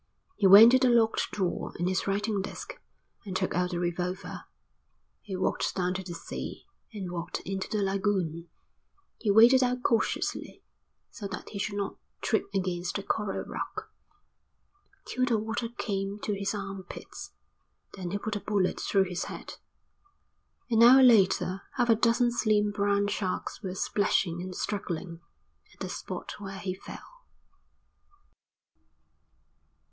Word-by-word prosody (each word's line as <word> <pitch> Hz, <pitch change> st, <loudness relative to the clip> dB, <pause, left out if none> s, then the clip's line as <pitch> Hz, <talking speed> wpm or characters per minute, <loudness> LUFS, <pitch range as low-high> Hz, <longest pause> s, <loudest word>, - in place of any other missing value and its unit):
He 195 Hz, -, +3 dB
went 210 Hz, +5 st, +10 dB
to 260 Hz, -, +5 dB
the 255 Hz, -1 st, +4 dB
locked 230 Hz, -2 st, +3 dB
drawer 190 Hz, -4 st, -2 dB
in 175 Hz, -, -1 dB
his 185 Hz, +1 st, 0 dB
writing 205 Hz, +1 st, 0 dB
desk 350 Hz, -, -7 dB, 0.5 s
and 195 Hz, -4 st, -6 dB
took 185 Hz, 0 st, 0 dB
out 180 Hz, +1 st, +1 dB
the 175 Hz, -, -3 dB
revolver. 175 Hz, +2 st, -3 dB, 0.8 s
He 195 Hz, -3 st, -6 dB
walked 185 Hz, -, -1 dB
down 180 Hz, -1 st, 0 dB
to 190 Hz, -, -3 dB
the 175 Hz, -2 st, -7 dB
sea -, -, -7 dB, 0.3 s
and 195 Hz, -5 st, -6 dB
walked 170 Hz, 0 st, -4 dB
into 190 Hz, 0 st, -4 dB
the 210 Hz, -2 st, 0 dB
lagoon; 190 Hz, -4 st, -1 dB, 0.7 s
he 215 Hz, -, -1 dB
waded 235 Hz, +6 st, +7 dB
out 250 Hz, 0 st, -1 dB
cautiously, 230 Hz, -, -1 dB, 0.5 s
so 205 Hz, -, -6 dB
that 195 Hz, -, -7 dB
he 200 Hz, -, -6 dB
should 200 Hz, +1 st, -2 dB
not 200 Hz, -1 st, -3 dB, 0.2 s
trip 220 Hz, -, 0 dB
against 180 Hz, -2 st, -2 dB
a 200 Hz, -, -5 dB
coral 210 Hz, -1 st, -2 dB
rock, 435 Hz, 0 st, -6 dB, 1.1 s
till 255 Hz, -, -2 dB
the 235 Hz, -3 st, +2 dB
water 225 Hz, +2 st, -2 dB
came 200 Hz, -4 st, -3 dB
to 210 Hz, -, -1 dB
his 200 Hz, +1 st, -2 dB
arm 195 Hz, -1 st, -5 dB
pits. -, -, -9 dB, 0.6 s
Then 185 Hz, -3 st, -5 dB
he 200 Hz, -, -1 dB
put 215 Hz, +1 st, -4 dB
a -, -, -1 dB
bullet 200 Hz, -3 st, 0 dB
through 195 Hz, -1 st, +2 dB
his 180 Hz, -2 st, -3 dB
head. -, -, -8 dB, 1.1 s
An 225 Hz, 0 st, +4 dB
hour 255 Hz, +3 st, +9 dB
later 195 Hz, -5 st, +4 dB
half 245 Hz, -2 st, +1 dB
a 225 Hz, -, +7 dB
dozen 235 Hz, +2 st, +3 dB
slim 210 Hz, -3 st, +2 dB
brown 200 Hz, 0 st, +1 dB
sharks 200 Hz, -2 st, -3 dB
were 190 Hz, -3 st, -5 dB
splashing 185 Hz, -3 st, 0 dB
and 185 Hz, 0 st, -6 dB
struggling 175 Hz, -4 st, -4 dB, 0.5 s
at -, -, -32 dB
the -, -, -4 dB
spot -, -, -6 dB
where 195 Hz, -1 st, -7 dB
he 190 Hz, -1 st, -3 dB
fell. -, -, -12 dB
200 Hz, 150 wpm, -28 LUFS, 185-220 Hz, 1.1 s, went